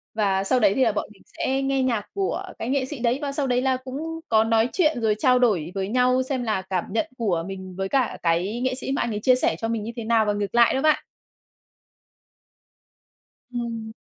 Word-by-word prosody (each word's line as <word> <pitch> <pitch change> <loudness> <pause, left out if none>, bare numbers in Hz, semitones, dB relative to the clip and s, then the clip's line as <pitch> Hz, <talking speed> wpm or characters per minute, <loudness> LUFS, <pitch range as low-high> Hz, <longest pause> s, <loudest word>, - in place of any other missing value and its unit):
Và 195 -3 +1
sau 255 +6 +2
đấy 205 -4 +4
thì 265 - +3
là 230 - +3
bọn 210 - -3
mình 195 - -23 0.2
sẽ 265 +1 0
nghe 270 -1 +1
nhạc 230 -5 -1
của 390 -1 -2 0.2
cái 225 - -3
nghệ 265 -1 +1
sĩ 275 -2 -7
đấy, 245 +2 +1
và 280 -1 -2
sau 280 -1 -1
đấy 250 -1 +1
là 260 0 +1
cũng 285 +6 -6
có 220 -2 +5
nói 225 +1 +2
chuyện 310 -8 +2
rồi 215 -2 +2
trao 250 +1 +4
đổi 185 -9 +1
với 190 -1 -1
nhau 255 +2 +3
xem 260 -1 -2
là 215 -5 0
cảm 190 -1 -2
nhận 230 +8 0
của 185 -8 0
mình 190 -1 -7
với 195 0 -2
cả 260 -1 +1
cái 180 +7 0
nghệ 260 0 0
sĩ 265 - -4
mà 275 - 0
anh 235 - -1
ấy 210 - -2
chia 255 +4 +4
sẻ 250 - +2
cho 225 - -2
mình 225 -2 -2
như 225 - -5
thế 230 - -5
nào 225 -1 +3
và 210 - +1
ngược 205 +1 -3
lại 235 -1 +5
đó 265 - 0
bạn. 310 0 +2 2.5
Ừm. 230 -2 -4
235 Hz, 235 wpm, -24 LUFS, 210-260 Hz, 2.5 s, có